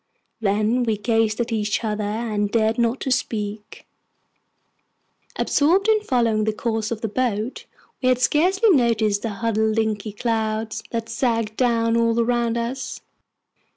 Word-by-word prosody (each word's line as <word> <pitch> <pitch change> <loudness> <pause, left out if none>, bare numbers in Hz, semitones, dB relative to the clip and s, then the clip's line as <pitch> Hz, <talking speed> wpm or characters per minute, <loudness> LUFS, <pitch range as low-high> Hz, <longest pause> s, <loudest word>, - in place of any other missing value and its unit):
Then 215 +3 +1
we 225 -3 0
gazed 225 0 +1
at 235 0 -3
each 210 0 -1
other, 210 -1 -2
and 210 -1 -1
dared 220 +1 +1
not 235 +2 0
speak. 210 -4 -4 1.5
Absorbed 355 +8 +2
in 435 -1 +4
following 230 - +1
the 220 - 0
course 225 -1 -2
of 225 -2 -4
the 225 - -1
boat, 225 0 -2 0.3
we 255 - +2
had 255 - +3
scarcely 370 - +3
noticed 225 - +2
the 230 - -2
huddled 220 +1 0
inky 215 -1 -1
clouds 220 -1 -2
that 230 -1 -3
sagged 230 -2 -1
down 230 -2 +2
all 230 0 +2
around 235 0 +1
us. 235 +3 -4
230 Hz, 140 wpm, -22 LUFS, 215-240 Hz, 1.5 s, in